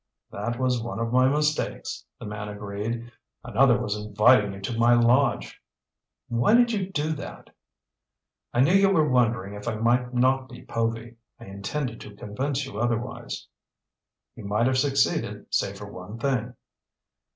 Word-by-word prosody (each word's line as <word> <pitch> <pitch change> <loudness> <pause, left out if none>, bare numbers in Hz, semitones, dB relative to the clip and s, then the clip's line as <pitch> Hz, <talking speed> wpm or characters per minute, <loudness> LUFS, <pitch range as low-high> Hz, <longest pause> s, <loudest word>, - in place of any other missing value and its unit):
"That 120 +4 -3
was 125 -2 +1
one 115 -4 -5
of 115 +1 -2
my 130 0 +5
mistakes," 150 +2 -1
the - - -9
man 105 0 -5
agreed. 105 +3 -5 0.3
"Another 120 +1 +4
was 105 0 -2
inviting 105 +1 +4
you 95 - -8
to 115 +4 -3
my 120 +1 +5
lodge." 120 +2 +2 0.7
"Why 120 - +3
did 240 0 +5
you 195 -4 -2
do 155 -3 -1
that?" 155 - -9 1.0
"I 120 - +2
knew 140 +7 +4
you 195 0 +5
were 160 -6 +3
wondering 120 -6 +1
if 105 +1 -8
I 115 - -1
might 120 +3 +1
not 130 +1 +2
be 120 - -11
Povy. 115 0 -3 0.2
I - - -11
intended 115 +6 -4
to 105 - -10
convince 135 +8 -3
you 120 -6 -7
otherwise." 120 +1 -3 0.9
"You - - -10
might 105 +3 +1
have 130 0 +2
succeeded 140 -1 +1
save 100 0 0
for 105 0 -9
one 90 +5 -8
thing." 125 -1 -1
120 Hz, 160 wpm, -26 LUFS, 105-130 Hz, 1.0 s, my